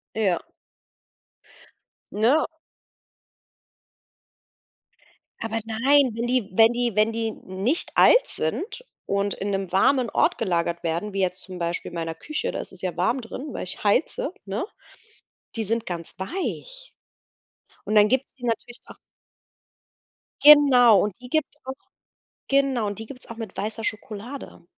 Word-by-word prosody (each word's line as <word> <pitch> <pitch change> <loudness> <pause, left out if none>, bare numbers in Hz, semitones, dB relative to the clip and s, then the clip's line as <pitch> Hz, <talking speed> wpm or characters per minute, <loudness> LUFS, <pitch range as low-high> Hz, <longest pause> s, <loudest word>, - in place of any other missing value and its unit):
Ja. 195 -6 +2 1.7
Ne? 240 +9 +3 2.9
Aber 225 0 -2
nein, 260 +5 +3
wenn 230 +1 -2
die 245 -4 0
wenn 225 +4 +6
die 240 -3 -1
wenn 215 +1 +3
die 225 0 -2
nicht 200 - -2
alt - - +7
sind 485 +2 -4 0.2
und 200 0 0
in 200 +1 -4
'nem 195 -2 -2
warmen 240 +5 +3
Ort - - +2
gelagert 170 -4 -1
werden, 170 +5 -2
wie 195 - -2
jetzt 185 0 -1
zum 185 -2 -9
Beispiel 170 0 -2
in - - -12
meiner 165 -1 -3
Küche- 305 - -3
da - - -4
ist - - -6
es 185 - -13
ja 180 -3 -3
warm 185 +10 +1
drin- 250 +4 -7
weil - - -5
ich 185 - -8
heize, 260 - +1
ne? 200 +3 -2 0.9
Die 225 - -1
sind 230 +2 -1
ganz 170 -2 -6
weich. 485 - -5 0.9
Und 215 - -2
dann 210 0 +6
gibt´s 260 +2 0
die 250 - -11
natürlich 240 +1 -3
auch - - -12 1.5
Genau 265 -8 +8
und 205 0 -3
die 250 - -10
gibt´s 300 +1 -1
auch 265 - -4 0.8
genau. 270 -5 +2
Und 205 -1 -4
die 225 - -7
gibt's 255 0 -11
auch 230 - -8
mit 225 -4 -8
weißer 220 +1 -4
Schokolade. 215 +1 -6
225 Hz, 145 wpm, -24 LUFS, 195-255 Hz, 2.9 s, Genau